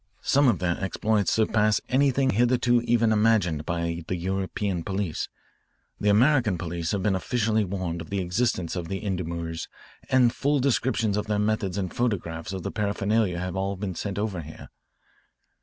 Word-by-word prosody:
Some 140 0 +4
of 115 -6 +3
their 90 +1 -1
exploits 105 +1 +1
surpass 110 -1 +2
anything 135 0 +2
hitherto 120 +1 +3
even 115 -1 +2
imagined 105 -8 +2
by 85 0 -2
the 95 - -1
European 95 0 -2
police. 95 -4 -3 0.7
The 105 - +1
American 120 -2 +4
police 85 -1 -3
have 100 -3 -1
been 105 - +2
officially 110 +2 +1
warned 90 -3 -3
of 80 - -10
the 100 - -1
existence 90 -1 -1
of 85 -2 -4
the 95 +4 -4
endormeurs 85 -3 -3 0.4
and 125 -2 +4
full 140 +2 +1
descriptions 115 -5 +1
of 105 - -2
their 105 -1 0
methods 105 -2 0
and 95 -3 -3
photographs 95 -8 -2
of 95 -2 -5
their - - -3
paraphernalia 100 -2 0
have 90 0 -3 0.3
been 95 -2 -3
sent 100 +2 -4
over 100 -4 -2
here. 80 0 -11
100 Hz, 160 wpm, -26 LUFS, 90-115 Hz, 0.7 s, Some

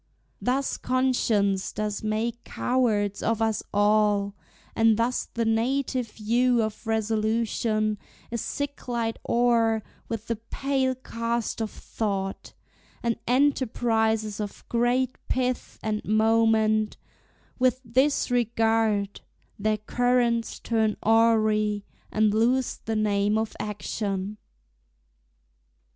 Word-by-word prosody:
Thus 265 +2 0
conscience 225 -7 +1
does 210 -1 -3
make 225 +2 -2
cowards 210 -6 0
of 225 -1 0
us 225 -1 +1
all; 205 -1 +3 0.4
And 225 -1 +4
thus 235 +2 0
the 230 -1 -2
native 245 +2 0
hue 235 +2 +2
of 215 +1 -5
resolution 220 -1 0 0.3
Is 235 -2 -2
sicklied 245 -5 -3
o'er 230 -2 +3 0.3
with 225 -1 -4
the 230 -1 -2
pale 260 +3 -1
cast 230 -2 -3
of 220 - -1
thought; 195 -4 -4 0.5
And 235 -1 0
enterprises 225 -5 +1
of 205 -1 -6
great 245 +2 +1
pith 255 -1 -1
and 215 -1 -1
moment, 220 0 +2 0.6
With 255 0 +3
this 260 +4 +2
regard, 225 -3 +1 0.4
their 215 +1 +1
currents 240 +1 +1
turn 220 -2 0
awry, 215 -2 +3 0.3
And 215 -1 +2
lose 245 +4 +2
the 225 - -1
name 210 0 +2
of 220 -1 -2
action. 210 -1 -3
225 Hz, 100 wpm, -26 LUFS, 215-240 Hz, 0.6 s, And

